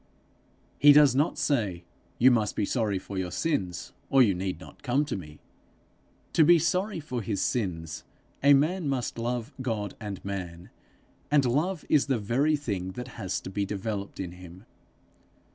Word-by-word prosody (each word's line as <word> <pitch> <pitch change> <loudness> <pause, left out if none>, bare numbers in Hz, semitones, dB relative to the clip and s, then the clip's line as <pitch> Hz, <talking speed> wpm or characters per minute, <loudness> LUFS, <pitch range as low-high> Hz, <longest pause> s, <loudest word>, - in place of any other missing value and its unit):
He 145 0 +8
does 145 -3 +7
not 145 +4 +1
say, 105 - 0 0.3
'You 130 +2 +6
must 110 -4 +1
be - - 0
sorry 110 -3 0
for 95 +1 -5
your 90 -1 -2
sins, 95 - -2 0.2
or 135 -1 +6
you 105 -5 +3
need 90 -1 -3
not - - -14
come 140 +3 +1
to 145 - -3
me:' 75 -6 -9 1.0
to 160 - +6
be 170 +3 +7
sorry 180 +4 0
for 125 -6 -4
his 100 -1 -2
sins 85 -9 -2 0.4
a 140 0 +7
man 155 +3 +1
must 125 -3 -2
love 120 +2 -3
God 110 -6 -2
and 105 -3 -7
man, 90 -3 -6 0.6
and 145 -2 +4
love 155 +8 0
is 145 -2 +3
the 135 -3 +1
very 130 +9 +1
thing 100 -10 -4
that 125 +4 -7
has 100 -6 -4
to 95 - -8
be 100 +1 -1
developed 100 0 -4
in 90 -3 -4
him. 90 +2 -13
115 Hz, 170 wpm, -27 LUFS, 95-140 Hz, 1.0 s, He